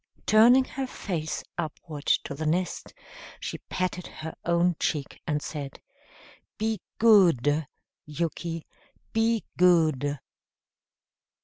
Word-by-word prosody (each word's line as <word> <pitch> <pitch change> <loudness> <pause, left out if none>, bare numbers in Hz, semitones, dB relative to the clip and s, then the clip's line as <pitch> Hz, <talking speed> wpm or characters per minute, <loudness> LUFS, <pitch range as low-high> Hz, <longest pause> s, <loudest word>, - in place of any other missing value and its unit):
Turning 235 +5 +7
her 270 0 -4
face 165 -10 -4 0.2
upward 155 -2 -6
to - - +2
the 155 +2 -3
nest, 175 +3 -1 0.5
she - - -5
patted 180 -1 -2
her 160 +1 -7
own 170 +1 +3
cheek 145 -4 -2
and 150 -2 -1
said: 140 -3 -6 0.8
"Be 220 0 -1 0.2
goodu, 160 - +5 0.4
Yuki, 165 +1 -3 0.5
be 225 0 +2 0.2
goodu." 155 -6 +4
170 Hz, 100 wpm, -27 LUFS, 150-200 Hz, 0.8 s, Turning